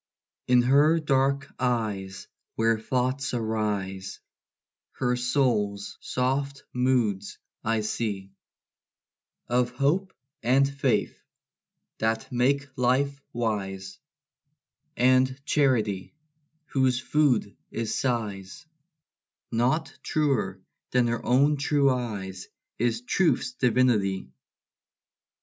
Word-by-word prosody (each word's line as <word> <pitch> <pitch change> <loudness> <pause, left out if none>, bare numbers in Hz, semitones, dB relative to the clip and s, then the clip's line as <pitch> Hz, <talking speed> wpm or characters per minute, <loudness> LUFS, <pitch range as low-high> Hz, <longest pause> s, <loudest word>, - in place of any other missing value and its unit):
In 125 -1 +5
her 145 +6 +5
dark 140 -1 +1
eyes, 105 -6 -2 0.3
where 115 0 +2
thoughts 130 +3 -1
arise, 105 -4 -2 0.7
Her 125 -1 0
soul's 115 -6 0
soft 140 +2 -1
moods 120 -6 0 0.3
I 110 0 +1
see: 105 -3 -3 1.2
Of 125 0 +2
hope 150 +10 0 0.3
and 130 +4 +4
faith, 140 0 0 0.8
that 110 +4 -1
make 135 +3 +1
life 140 +2 +1
wise; 95 -5 -3 1.0
And 130 +1 +3
charity, 120 -8 +1 0.5
whose 130 -4 +1
food 140 -7 +1
is 115 -1 -3
sighs 105 -7 -3 0.9
Not 125 +8 +1
truer 120 -12 0 0.3
than 125 -1 +3
her 120 -1 -2
own 140 +4 +3
true 140 -1 +3
eyes 100 -7 -4 0.3
Is 115 0 +1
truth's 180 - +1
divinity. 110 - +1
125 Hz, 85 wpm, -26 LUFS, 105-135 Hz, 1.2 s, In